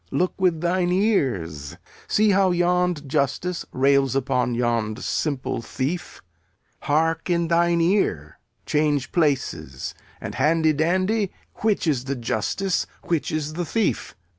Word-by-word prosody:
Look 180 - 0
with 175 -4 +2
thine 175 +1 +1
ears. 110 - 0 0.3
See 215 0 +3
how 195 -1 +4
yond 175 -3 +1
justice 150 +6 -1
rails 135 0 +3
upon 125 -2 0
yond 115 -2 -1
simple 140 -6 -2
thief. 145 +9 -4 0.6
Hark 165 +3 0
in 170 -1 +1
thine 170 0 +3
ear. 165 - 0 0.3
Change 150 -2 +1
places 140 - -1 0.3
and, - - -6
handy 160 0 +3
dandy, 185 +6 +1 0.3
which 215 -4 +1
is 135 -6 0
the 140 +1 -2
justice, 125 - -1 0.2
which 165 -3 0
is 155 -1 -2
the 175 +2 -2
thief? 220 +6 -1
160 Hz, 125 wpm, -23 LUFS, 135-180 Hz, 0.6 s, how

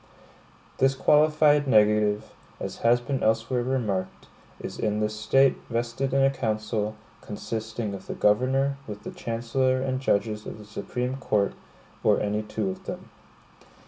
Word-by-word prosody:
This 135 0 +3
qualified 150 0 +4
negative, 105 -2 +3 0.3
as - - -5
has 120 +1 +3
been 130 +2 -3
elsewhere 115 +3 +1
remarked, 110 -7 -2 0.3
is - - -7
in 105 -1 0
this 105 0 0
State 135 +5 +3
vested 120 +3 -1
in 135 0 +3
a 135 - +4
council, 110 -4 -2 0.3
consisting 110 0 -4
of 95 -1 -8
the - - -4
governor, 135 +6 +2
with 105 -1 -7
the - - -6
chancellor 120 +3 0
and 130 0 -2
judges 105 -3 0
of - - -7
the 105 - -12
Supreme 125 +5 -4
Court, 105 -6 +1 0.5
or - - +4
any 105 +1 -1
two 105 -2 -2
of - - -10
them. - - -7
115 Hz, 145 wpm, -26 LUFS, 105-130 Hz, 0.5 s, qualified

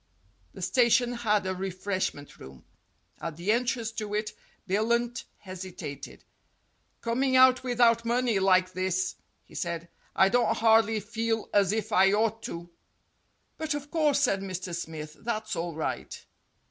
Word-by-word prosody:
The - - -7
station 245 -1 +3
had 210 -4 +1
a 185 - -1
refreshment 185 -5 -4
room. 65 -1 -13 0.6
At 165 -2 -5
the 180 +5 0
en 240 +3 +2
trance 235 -3 -2
to 210 -1 -3
it 215 0 -2 0.3
Billunt 235 +4 0
hesitated. 180 -7 -8 0.8
"Coming 260 +3 +1
out 255 0 +6
without 240 -2 +3
money, 235 -2 +1
like 185 -1 +3
this," 185 0 -1 0.3
he - - -20
said, 170 -1 -4 0.3
"I 190 - +5
don't 240 0 +2
hardly 225 -1 +4
feel 225 +1 -2
as 200 -2 +4
if 220 0 -2
I 195 -1 +5
ought 225 +1 +1
to." 170 +1 -8 0.9
"But, 310 -2 -1
of 290 0 -7
course," 300 -4 +2
said 200 -8 +2
Mr. 185 -2 -5
Smith, 155 -2 -7
"that's 220 -3 -3
all 170 -1 -3
right." 160 - -4
210 Hz, 145 wpm, -28 LUFS, 185-235 Hz, 0.9 s, out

